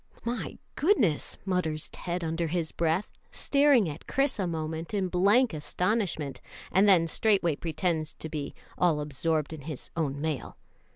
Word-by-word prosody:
"My 240 +1 -3 0.2
goodness!" 265 - +2
mutters 170 -5 0
Ted 175 0 -4
under 165 +1 -1
his 165 -1 -1
breath, 165 +4 0 0.2
staring 280 -7 +4
at 150 0 -7
Chris 275 -4 +1
a 190 - +1
moment 160 +3 -3
in 190 -2 0
blank 200 +6 +4
astonishment, 175 -1 -1 0.3
and 200 +2 +5
then 175 -4 +6
straightway 185 -2 +2
pretends 160 0 -1
to - - -6
be 150 -3 -5 0.2
all 170 -4 +3
absorbed 150 +2 -1
in 155 - -7
his 150 -1 -7
own 145 -4 -1
mail. 155 -3 -3
165 Hz, 150 wpm, -28 LUFS, 155-195 Hz, 0.3 s, then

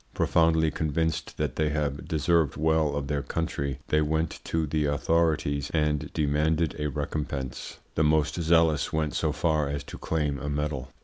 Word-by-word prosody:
Profoundly 80 -1 +3
convinced 80 +2 -1
that - - -2
they 75 -1 +2
have 75 -2 -2
deserved 80 -2 +1
well 80 -1 +2
of 70 -1 -2
their 70 0 -1
country, 70 -3 -3
they 75 - +3
went 80 +2 -1
to 80 -1 0
the 75 0 0
authorities 75 -1 +1
and 75 -1 0
demanded 75 +1 +1
a 75 - 0
recompense. 70 -3 -4 0.2
The 80 - +2
most 80 +2 +2
zealous 80 -1 +3
went 80 -1 -1
so 80 - 0
far 75 -2 +1
as 70 0 -3
to - - -10
claim 75 -4 -1
a 75 - -4
medal. 70 -2 -3
75 Hz, 165 wpm, -27 LUFS, 70-80 Hz, 0.2 s, Profoundly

